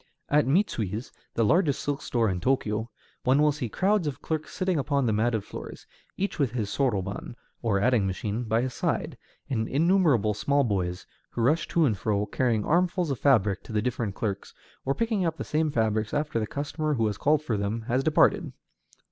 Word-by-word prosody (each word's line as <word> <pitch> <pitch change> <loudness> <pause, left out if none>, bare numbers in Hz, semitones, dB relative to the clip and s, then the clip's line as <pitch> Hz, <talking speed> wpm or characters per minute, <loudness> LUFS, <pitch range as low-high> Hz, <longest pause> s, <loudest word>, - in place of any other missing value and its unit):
At 145 -2 +3
Mitsui's, 120 - 0 0.2
the 115 - +2
largest 155 - +3
silk 145 -1 -2
store 115 -2 0
in 95 -3 -1
Tōkyō, 110 -1 0 0.4
one 130 +3 +3
will 150 0 +5
see 135 -5 -4
crowds 195 - +1
of 140 -2 -4
clerks 155 0 -3
sitting 185 -3 0
upon 140 -1 +1
the 110 - +2
matted 110 0 +1
floors, - - -9 0.3
each 200 -2 -2
with 130 -6 +1
his 110 -5 -2
soroban, 105 -5 -1 0.3
or 110 -4 +1
adding 115 -2 +2
machine, 105 +5 -3
by 115 +2 +1
his 130 -1 -3
side; - - -1 0.3
and 110 -4 -1
innumerable 150 - +3
small 140 +8 +1
boys, 95 -5 -2 0.2
who 120 - -4
rush 150 +7 +2
to 165 -2 +2
and 110 -8 0
fro, 105 -1 0
carrying 110 0 0
armfuls 175 -1 +1
of 135 - -3
fabrics 105 -8 +3
to - - -10
the 105 - +2
different 115 -5 -2
clerks, 100 -3 -4 0.3
or 135 +1 +1
picking 225 -4 0
up 165 -2 -1
the - - -4
same 155 0 0
fabrics 110 -3 0
after 145 -5 0
the 110 - -2
customer 150 +3 -2
who 115 -3 +1
has 105 -2 -2
called 150 +1 +2
for 120 -7 -1
them 105 +3 -2
has 130 +3 0
departed. 155 0 +3
125 Hz, 195 wpm, -27 LUFS, 110-150 Hz, 0.4 s, will